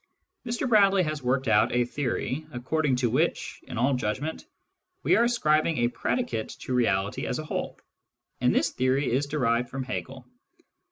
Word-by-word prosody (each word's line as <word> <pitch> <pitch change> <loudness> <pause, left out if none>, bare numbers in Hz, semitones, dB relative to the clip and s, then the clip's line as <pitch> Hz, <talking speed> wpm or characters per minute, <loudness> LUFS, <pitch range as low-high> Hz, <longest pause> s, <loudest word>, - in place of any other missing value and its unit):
Mr 240 +3 -1
Bradley 200 -4 +5
has 155 -2 -3
worked 130 +1 0
out 105 - +4
a 120 0 +3
theory 135 +3 -3
according 135 +2 0
to 125 -1 +1
which, - - 0
in - - -6
all 130 +4 +2
judgment, 130 +6 -3 0.6
we - - +4
are 235 - +4
ascribing 155 - +2
a 120 0 +2
predicate 240 - -2
to 130 - -4
Reality 100 -5 0
as - - -2
a 155 - -5
whole; - - -4 0.6
and - - +3
this - - +1
theory 130 +2 +1
is 135 +4 +1
derived 125 -5 0
from 135 0 -4
Hegel. 130 0 -6
130 Hz, 165 wpm, -27 LUFS, 125-155 Hz, 0.6 s, Bradley